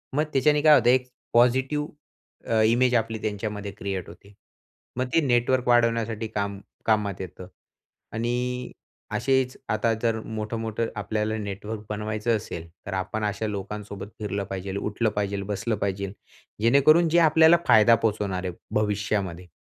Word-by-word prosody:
मग 150 - +3
त्याच्याने 145 +2 +3
काय 155 -1 +7
होतं? 120 -3 +4
एक 125 0 +3 0.3
पॉझिटिव्ह 130 +5 +3 0.6
अ, 110 -1 +2
इमेज 120 +3 +3
आपली 115 -1 0
त्यांच्यामध्ये 105 -1 -4
क्रिएट 95 -4 -4
होते. 100 +4 -15 0.6
मग 130 - +1
ते 165 - +5
नेटवर्क 125 -1 +2
वाढवण्यासाठी 115 -2 +2
काम 100 -2 -3 0.3
कामात 105 -3 +1
येतं. 90 0 -8 0.7
आणि 125 +2 -2 0.4
असेचं 130 0 +1
आता 115 +1 +1
जर 115 -1 +1
मोठं-मोठं 110 +1 -3
आपल्याला 110 +1 -2
नेटवर्क 105 +1 -5
बनवायचं 110 +2 -1
असेल. 85 -4 -7 0.2
तर 100 - -5
आपण 100 +3 -3
अशा 105 +1 -2
लोकांसोबत 100 0 -6
फिरलं 100 -2 -2
पाहिजेल, 95 0 -4
उठलं 105 +3 -1
पाहिजेल, 100 -1 -1
बसलं 105 +3 -1
पाहिजेल. 100 0 -2 0.5
जेणेकरून 155 +8 +5
जे 170 +2 +4
आपल्याला 160 +2 +6
फायदा 110 +2 +7
पोहचवणार 100 -4 -1
आहे 90 - -3 0.3
भविष्यामध्ये. 100 -4 -2
110 Hz, 140 wpm, -25 LUFS, 100-120 Hz, 0.7 s, काय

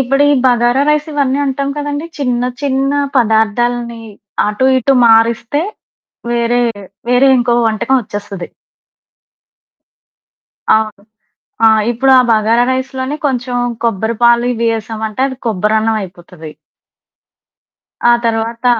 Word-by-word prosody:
ఇప్పుడు 275 +2 +1
ఈ - - +4
బగారా 240 +1 +2
రైస్ 300 0 +1
ఇవన్నీ 280 -2 0
అంటాం 275 0 -2
కదండీ! 290 +1 -4
చిన్న, 250 -4 -1 0.2
చిన్న 275 0 0 0.2
పదార్థాల్ని 235 +1 0 0.5
అటు 210 +5 0
ఇటు 265 +2 +1
మారిస్తే, 230 +5 +2 0.7
వేరే, 240 +1 +1 0.5
వేరే 250 +2 +4
ఇంకో 240 0 +1
వంటకం 225 +4 0
ఒచ్చేస్తది. 205 -4 -7 2.3
అవును. 215 -2 -2 0.6
ఆ! - - +8 0.2
ఇప్పుడు 265 +3 +1
ఆ - - +6
బగారా 225 +2 +2
రైస్ 260 +1 -3
లోనే 260 +3 -3
కొంచెం 250 -2 -2 0.3
కొబ్బరిపాలు 235 +2 +1
ఇవి 230 0 -1
ఏసామంటే, 220 +1 -5
అది 265 - -6
కొబ్బరన్నమయిపోతది. 200 -6 -2 1.6
ఆ - - +6
తర్వాత 230 +1 -2
235 Hz, 105 wpm, -14 LUFS, 220-260 Hz, 2.3 s, ఆ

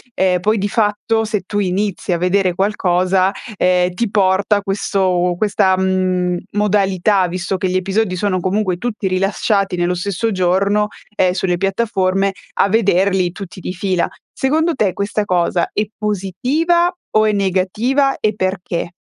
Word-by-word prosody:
ehm 185 -1 +2
poi 215 +5 +1
di 200 0 -1
fatto, 220 +1 0
se 210 -2 -2
tu 205 +3 -3
inizi 195 0 -1
a 175 - +2
vedere 180 +1 +1
qualcosa, 185 -1 +1 0.3
ehm, 180 -1 +2
ti 230 +4 -1
porta 200 +1 +2
questo 190 -3 0
questa, 195 -2 +2
mhmm, 185 -1 0
modalità 200 -2 +2
visto 180 +2 -3
che 185 0 -1
gli 180 - -2
episodi 190 +1 0
sono 185 0 0
comunque 185 0 0
tutti 215 0 -3
rilasciati 195 +1 0
nello 175 0 0
stesso 200 +5 -2
giorno, 195 +3 +1 0.3
ehm, 185 -3 +2
sulle 180 -1 0
piattaforme 195 -1 0 0.2
a - - +2
vederli 190 -3 +2
tutti 185 0 -9
di 180 - -5
fila. 185 -1 0 0.3
Secondo 320 +5 +1
te 205 - 0
questa 205 +1 -1
cosa 175 -2 +1
è 210 - 0
positiva 250 - 0 0.2
o 215 0 +3
è 215 - +3
negativa 210 +8 +1
e 215 0 +1
perché? 185 -3 -2
195 Hz, 150 wpm, -18 LUFS, 185-210 Hz, 0.3 s, o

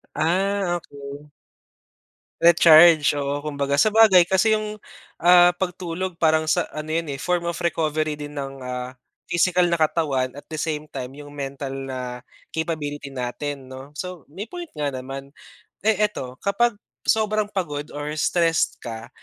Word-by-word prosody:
Ah, 185 +4 +1
okay. 145 -2 -9 1.1
Recharge, 165 -2 +7
oo, 145 +1 -2
kumbaga 140 -2 -1
sabagay 215 +1 +6
kasi, 190 +5 +3
yung, 215 0 -4 0.4
ah, 175 0 +7
pagtulog 180 0 -3
parang 160 -1 +2
sa 170 +2 +2
ano 155 0 -6
'yun, 165 -2 -1
eh, 135 - -5
form 180 +2 0
of 170 - -4
recovery 155 -3 0
din, 145 0 -8
ng, 135 -1 -5
ah, 125 0 -5 0.4
physical 180 +1 +3
na 170 - +1
katawan 145 -5 +1
at 145 - -9
the 155 - -4
same 155 -1 -2
time 125 0 -5
yung 145 0 -11
mental 140 -1 -5 0.2
na, 125 -1 -5 0.3
capability 150 -3 -3
natin 135 +2 -5
'no? 130 +2 -10
So, 180 -3 -6
may 200 +6 -6
point 350 +4 -8
nga 145 -2 -1
naman, 135 +2 -7 0.5
eh, 215 0 +3
eto 130 -11 -6
kapag 205 +2 +1 0.3
sobrang 215 -1 +1
pagod 150 -7 -3
or 145 0 -4
stressed 165 0 +1
ka, 115 -1 -7
155 Hz, 145 wpm, -23 LUFS, 140-180 Hz, 1.1 s, Recharge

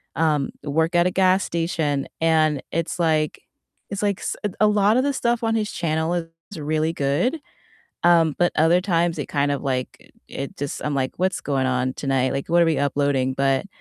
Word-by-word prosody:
um, 150 -3 +1
work 160 +4 0
at 175 0 +4
a 180 - -1
gas 185 +1 +3
station, 160 -4 -1
and 155 -3 +2
it's 165 +2 -2
like 155 -2 0 0.5
it's 200 -1 -4
like 200 -2 0
s - - -3
a 210 - 0
a 215 - +5
lot 210 +1 +3
of 255 - +3
the 285 - +1
stuff 240 -2 0
on 225 -1 0
his 215 -1 -1
channel 160 0 -1
is 165 +1 -6
really 155 +2 0
good, 165 - 0 0.6
um, 165 -3 +4
but 175 0 +3
other 165 +3 +4
times 170 -3 0
it - - -3
kind 145 -1 0
of 140 - -2
like 130 -2 -4 0.2
it 135 0 -6
just 145 0 -4
I'm 150 -1 -1
like, 130 -1 -1
"What's 185 0 0
going 135 -2 -1
on 130 0 0
tonight?" 135 -2 0
Like, 140 - -4
"What 170 0 +5
are - - +2
we 160 -2 +1
uploading?" 140 -2 0
But, 135 +5 +1
160 Hz, 200 wpm, -23 LUFS, 140-175 Hz, 0.6 s, a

